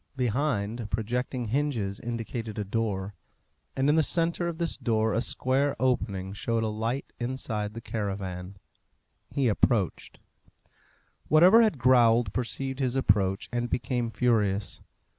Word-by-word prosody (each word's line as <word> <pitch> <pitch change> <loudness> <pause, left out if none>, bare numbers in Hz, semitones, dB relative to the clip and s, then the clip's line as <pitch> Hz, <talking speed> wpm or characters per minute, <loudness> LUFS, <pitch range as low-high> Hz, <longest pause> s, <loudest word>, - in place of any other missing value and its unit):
Behind, 120 -4 -1
projecting 120 +3 -2
hinges 120 -7 -1
indicated 115 -1 -5
a 105 - -1
door, 100 -2 -2 0.6
and 135 +1 +1
in 145 - +5
the 160 - +4
centre 170 +2 0
of 170 -2 -4
this 170 -1 0
door 110 -2 0
a 115 - +1
square 135 +3 0
opening 100 -7 0
showed 115 +3 -1
a 110 - 0
light 115 +5 -3
inside 115 -4 -3
the 115 - -6
caravan. 95 -4 -4 0.8
He 140 -3 +2
approached. 105 -3 0 1.1
Whatever 180 +9 +7
had 215 -9 +2
growled 120 -4 +4
perceived 135 +2 -3
his 130 -2 0
approach, 100 -6 +1
and 120 0 -1
became 120 -1 -1
furious. 105 -4 0
115 Hz, 130 wpm, -28 LUFS, 105-130 Hz, 1.1 s, Whatever